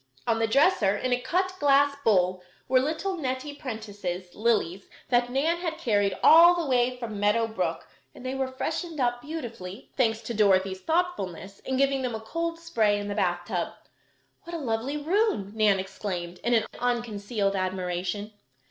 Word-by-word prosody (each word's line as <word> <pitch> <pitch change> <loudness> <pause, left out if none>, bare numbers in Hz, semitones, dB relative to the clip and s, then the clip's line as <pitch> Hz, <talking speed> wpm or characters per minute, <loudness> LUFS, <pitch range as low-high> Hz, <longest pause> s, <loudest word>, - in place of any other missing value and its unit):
On 230 -1 +1
the 225 - +2
dresser, 225 - +3
in 255 +3 0
a 245 - 0
cut 370 +8 0
glass 285 0 +4
bowl, 185 -4 +3 0.3
were 255 0 +4
little 320 +8 -1
Nettie 265 -1 -3
Prentice's 205 - -6
lilies 210 -5 0 0.2
that 245 -1 +2
Nan 295 +7 +1
had 335 -2 -3
carried 205 -4 +1
all 340 +2 +8
the 340 -2 -1
way 250 -1 +2
from 225 -4 -5
Meadow 210 +3 +3
Brook, 220 0 -3 0.3
and 250 - -11
they 255 - -2
were 270 -1 -1
freshened 315 +4 -4
up 245 -1 +1
beautifully, 235 - -7
thanks 225 -4 +1
to 235 - -4
Dorothy's 190 -3 +2
thoughtfulness 315 - -2
in 265 - -3
giving 275 0 +2
them 250 -3 -2
a - - -4
cold 335 +9 -3
spray 225 -12 +1
in 205 0 -4
the - - -1
bath 175 -3 0
tub. 180 -4 -2 0.7
"What 340 0 -6
a 310 -5 -4
lovely 235 +5 -1
room!" 320 - 0
Nan 215 -3 +3
exclaimed, 180 -2 -5
in 235 -2 +2
unconcealed 220 -4 -1
admiration. 185 +2 -2
235 Hz, 165 wpm, -27 LUFS, 200-280 Hz, 0.7 s, all